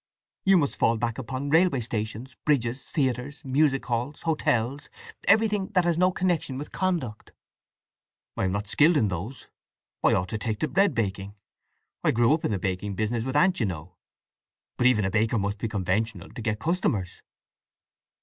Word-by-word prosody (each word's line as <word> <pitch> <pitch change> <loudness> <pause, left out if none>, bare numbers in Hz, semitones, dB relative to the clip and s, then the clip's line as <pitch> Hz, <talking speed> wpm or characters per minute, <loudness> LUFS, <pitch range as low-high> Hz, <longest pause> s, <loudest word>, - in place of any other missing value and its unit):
You 195 -1 +6
must 145 -5 0
fall 115 - +3
back 115 +1 -2
upon 130 +3 -4
railway 165 -5 +4
stations, 115 +3 -4
bridges, 130 -3 0
theatres, 135 +1 -2
music 135 0 +2
halls, 125 +4 -3
hotels—everything 165 - 0
that 180 -2 +4
has 170 -1 +2
no 185 0 +4
connection 175 -7 -1
with 145 - -7
conduct." 165 - -2 1.0
"I - - 0
am 95 - 0
not 100 +1 -3
skilled 155 - +4
in 110 -7 +2
those… 100 +9 -5 0.6
I - - +5
ought 90 0 -1
to 110 - -3
take 110 -1 -3
to 155 - +1
bread 195 -4 +2
baking. 100 -2 -2 0.7
I - - +3
grew 120 +4 +4
up 155 - -1
in - - 0
the 105 - 0
baking 95 +2 -3
business 110 +3 -1
with 130 +2 -4
aunt, 185 +5 +3
you 110 - +1
know. 90 0 -7 0.8
But 125 - +3
even 105 -5 +3
a 95 - -1
baker 115 +2 +1
must 100 0 -2
be 115 - -2
conventional, 105 0 -2
to - - -8
get 105 -1 -1
customers." 155 - -1
120 Hz, 170 wpm, -26 LUFS, 105-150 Hz, 1.0 s, You